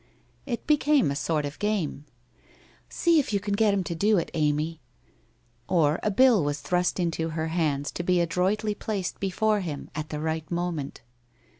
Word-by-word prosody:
It 240 -3 -3
became 295 - +3
a - - -2
sort 150 +2 -1
of 145 +1 -7
game: 195 -9 -1 0.4
' - - -29
See 335 -2 +3
if 280 - -1
you 200 - +1
can 205 +1 -3
get 210 0 +3
him 200 -2 0
to 170 - -4
do 205 +5 +2
it, 170 - -2
Amy! 155 +1 0 0.4
' 120 0 -39
Or 150 -1 +3
a - - +1
bill 230 - +5
was 145 0 -1
thrust 180 +3 0
into 165 -2 -1
her 160 0 -3
hands 150 -4 0
to - - -4
be 180 0 +2
adroitly 190 +5 0
placed 200 -3 -4
before 210 +2 +1
him 160 -7 -5
at 155 0 -5
the 150 - -4
right 160 0 -3
moment. 170 -5 -3
175 Hz, 185 wpm, -26 LUFS, 155-205 Hz, 0.4 s, bill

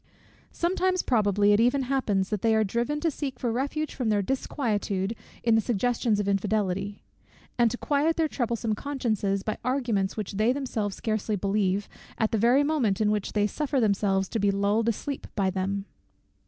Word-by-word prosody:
Sometimes, 370 +1 0
probably, 205 -3 +3
it 205 - +4
even 250 +4 +3
happens 225 -8 0
that 210 -3 -2
they 225 -1 +3
are 220 - +3
driven 235 +8 -1
to 330 - +1
seek 275 -3 -5
for 240 - -1
refuge 280 +5 -2
from 250 -4 -1
their 205 -2 +2
disquietude 215 -5 -1 0.3
in 230 - +3
the 225 - +4
suggestions 235 0 0
of 205 - -1
infidelity; 200 0 -1 0.5
and 240 -1 +4
to 245 - -4
quiet 300 +4 +1
their 325 -1 +2
troublesome 235 -5 -1
consciences 215 -6 -1
by 215 - -3
arguments 235 -7 0
which 210 -3 -3
they 220 +3 +3
themselves 225 -7 -2
scarcely 215 -1 -1
believe, 200 0 0 0.3
at 220 - +1
the 220 - +1
very 245 +6 +4
moment 270 -10 +1
in 210 -1 +2
which 210 -2 -2
they 205 -1 +2
suffer 280 +5 -1
themselves 200 -3 +1
to 225 - -2
be 205 0 +2
lulled 200 +3 +1
asleep 275 +5 -4
by 195 -3 +1
them. 195 +1 -2
220 Hz, 180 wpm, -27 LUFS, 200-255 Hz, 0.5 s, it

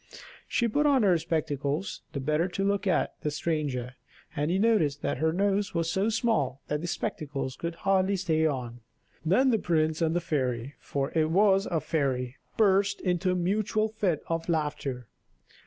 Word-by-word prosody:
She 235 - +1
put 295 +7 +2
on 270 -5 +4
her 180 -4 +4
spectacles 155 0 -2
the 140 - -2
better 155 +5 +1
to 195 +1 -3
look 200 0 0
at 185 - +1
the 150 - -1
stranger, 145 -5 -2 0.4
and 150 +1 0
he 180 - +2
noticed 195 -10 +2
that - - -1
her 160 +1 +2
nose 200 +2 0
was 165 -1 0
so 195 +3 +1
small 220 - 0
that 150 0 -1
the 175 - -4
spectacles 145 -10 -3
would 170 0 -3
hardly 195 +2 +2
stay 160 -4 +1
on; 125 -5 -4 0.4
then 225 +11 +3
the 225 - +2
prince 160 -2 +1
and 165 0 +1
the - - +3
fairy, 130 -5 -2
for 135 -1 -3
it 160 -1 +3
was 195 +2 +4
a 165 - 0
fairy 135 -5 -1 0.2
burst 200 -1 +3
into 180 0 0
a 180 - +2
mutual 215 +4 0
fit 200 -7 -1
of 165 +1 -3
laughter. 145 -6 -2
165 Hz, 175 wpm, -28 LUFS, 145-195 Hz, 0.4 s, on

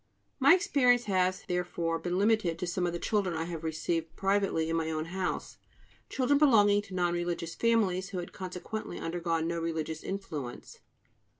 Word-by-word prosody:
My 280 +5 +7
experience 250 -8 +3
has, 185 -3 +1
therefore, 175 -2 -1
been 175 +1 -2
limited 200 -5 +2
to 180 - -3
some 175 +1 -1
of - - -1
the 170 - -3
children 195 -2 0
I 160 - -1
have 165 -1 -6
received 160 +1 -2
privately 195 -5 +1
in 165 - -1
my 160 -1 0
own 155 0 -2
house, 185 +2 -3 0.5
children 275 +2 +2
belonging 205 -8 +5
to 195 -2 -10
non 175 -1 +1
religious 175 -1 -2
families, 200 -5 +1
who 195 - -5
had 175 -1 -5
consequently 185 +3 -6
undergone 165 -1 -1
no 170 0 -2
religious 160 -1 -3
influence. 155 -10 -6
180 Hz, 170 wpm, -30 LUFS, 165-205 Hz, 0.5 s, My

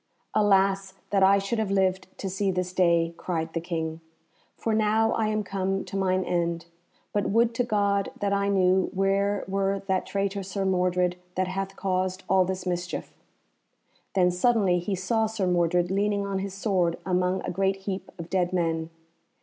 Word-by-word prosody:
"Alas! 195 -2 +2 0.2
that 200 -1 +3
I 195 +1 +6
should 200 +4 -1
have 215 -3 0
lived 190 -1 +1
to 195 - -4
see 195 +1 -1
this 180 -1 -2
day," 170 -2 +3
cried 160 -2 -3
the 165 - -1
King, 160 -1 -3 0.6
"for 225 - -1
now 220 +1 +3
I 220 - +1
am 215 0 0
come 195 0 -2
to - - -8
mine 185 -1 +1
end; 170 -1 -1 0.5
but 205 -1 0
would 230 +2 +3
to 245 - +1
God 200 -3 +1
that 200 -1 0
I 200 0 +1
knew 190 -1 +3
where 195 +1 +1
were 195 0 0
that 190 -1 0
traitor 200 0 -1
Sir 195 +1 -3
Mordred 180 -1 +1 0.2
that 185 0 0
hath 195 +1 -3
caused 185 -1 -1
all 190 -1 +4
this 185 0 -4
mischief." 175 -1 -3 1.0
Then 180 -2 +4
suddenly 190 -1 +2
he 190 +3 -2
saw 220 +4 0
Sir 215 -3 -2
Mordred 175 0 +2
leaning 200 +1 +1
on 195 -1 -2
his 195 0 -5
sword 185 -4 +1
among 180 0 +1
a - - -3
great 195 +2 +1
heap 195 -1 -4
of 170 -2 -7
dead 180 -1 +1
men. 165 -2 0
190 Hz, 175 wpm, -26 LUFS, 180-200 Hz, 1.0 s, I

